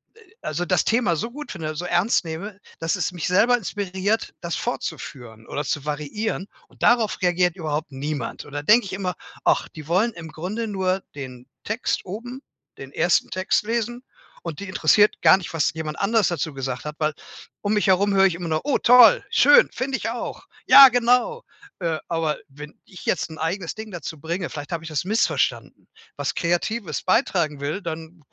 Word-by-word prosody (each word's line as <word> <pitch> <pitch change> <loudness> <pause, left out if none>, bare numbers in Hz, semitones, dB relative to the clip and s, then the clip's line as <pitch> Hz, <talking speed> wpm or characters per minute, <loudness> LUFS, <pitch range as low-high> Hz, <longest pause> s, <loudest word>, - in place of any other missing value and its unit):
Äh, - - -20 0.2
also 170 +4 -3
das 180 0 +1
Thema 225 -7 +2
so 230 +10 -3
gut 295 +3 -8
finde, 155 -4 -5
so 175 +3 -4
ernst 175 +3 +2
nehme, 185 +6 -6 0.2
dass 165 +4 0
es 175 -3 -1
mich 175 -3 -4
selber 220 +7 +4
inspiriert, 200 0 -2
das 170 -1 -3
fortzuführen 125 - -6
oder 145 - -3
zu 145 +1 -2
variieren, 155 +8 -3 0.2
und - - -12
darauf 230 -4 +3
reagiert 180 0 +2
überhaupt 155 -3 -3
niemand. 140 -2 -4
Und 145 - -14
dann 145 0 -4
denke 225 +4 +5
ich 190 - -7
immer: 185 -2 -3 0.3
„Ach, - - +2
die 155 -2 -11
wollen 205 +7 +2
im 165 -2 -9
Grunde 195 +9 -4
nur 190 -1 -1
den 125 -3 -8 0.2
Text 225 -1 -2
oben, 245 +7 -7 0.4
den 135 0 -10
ersten 170 +3 +2
Text, 185 +2 0
lesen 235 +2 -2 0.4
und 170 0 -6
die 200 - -6
interessiert 205 +2 +3
gar - - +7
nicht, 180 - -8
was 165 -1 +1
jemand 155 -1 -5
anderes 220 +1 +2
dazu 160 -2 -3
gesagt 130 -1 -4
hat“, 150 0 -5
weil 155 -1 +1 0.5
um 205 +1 0
mich 210 -1 +1
herum 195 +2 +3
höre 195 0 +5
ich 185 -3 +2
immer 175 0 -5
noch 155 +6 -1
höre: 285 -1 -1
„Oh - - +4
toll, 250 - +7
schön, 485 +1 +6
finde 265 0 -2
ich 225 - -3
auch.“ 240 +1 -6 0.2
Ja 275 -1 +11
genau, 250 - +2 0.4
äh, 165 -4 -1
aber 165 -2 -1
wenn 145 +2 -12
ich 185 - -13
jetzt - - 0
'n 160 - -10
eigenes 170 +5 -3
Ding 220 -1 -8
dazu 165 -2 -6
bringe- 170 +3 -3
vielleicht 145 +2 -7
habe 165 -1 -3
ich 165 - -8
das 150 -3 -1
missverstanden- 215 +5 -1 0.3
was - - -3
Kreatives 175 +5 -1
beitragen 175 - +1
will, 150 +8 -3
dann 165 -1 -7
180 Hz, 195 wpm, -23 LUFS, 155-215 Hz, 0.5 s, Ja